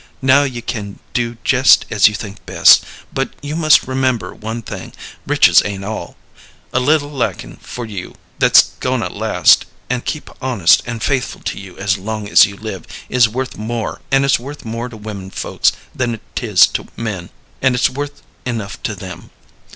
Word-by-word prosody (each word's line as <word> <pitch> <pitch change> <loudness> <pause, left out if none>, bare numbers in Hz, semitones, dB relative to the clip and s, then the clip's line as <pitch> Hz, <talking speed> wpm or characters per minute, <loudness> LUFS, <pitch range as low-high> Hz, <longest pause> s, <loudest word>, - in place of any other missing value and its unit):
Now 135 +1 +6
you 125 -4 -3
can 100 -4 -5 0.2
do 120 -1 -1
jest 130 0 +5
as 105 -2 +6
you 105 - -1
think 105 -1 -8
best, - - +6 0.3
but - - -1
you 145 +1 -4
must 155 -2 +4
remember 130 -2 -1
one 110 +2 -6
thing 95 -3 -8 0.3
riches - - +6
ain't 100 -1 -5
all. 110 +1 -6 0.6
A 130 - +3
little 145 +2 +2
likin' 115 - -3
for 120 - -7
you 100 -5 -7 0.2
that's - - +6
goin' - - 0
to - - -2
last, - - +3 0.3
and 125 -1 -1
keep 155 - -5
honest 120 -10 +4
and 115 -2 -4
faithful 130 0 -1
to - - -4
you 95 -2 -11
as 95 0 0
long 105 +1 -4
as 100 - +7
you 100 -1 -10
live, 100 -5 -7 0.2
is 120 -3 +4
worth 130 +3 -4
more; 115 +1 -4
an' 135 0 +4
it's 140 - +3
worth 140 +3 -9
more 115 +2 -4
to 115 - -11
women 105 -3 -7
folks - - 0 0.2
than 120 -3 -2
't - - -3
is 100 -5 +7
to - - -4
men, 100 -6 -4 0.3
an' 130 -2 +3
it's 125 - +3
worth 145 +2 -6 0.2
enough 115 -5 -4
to - - -3
them. - - -9
115 Hz, 180 wpm, -17 LUFS, 105-130 Hz, 0.6 s, as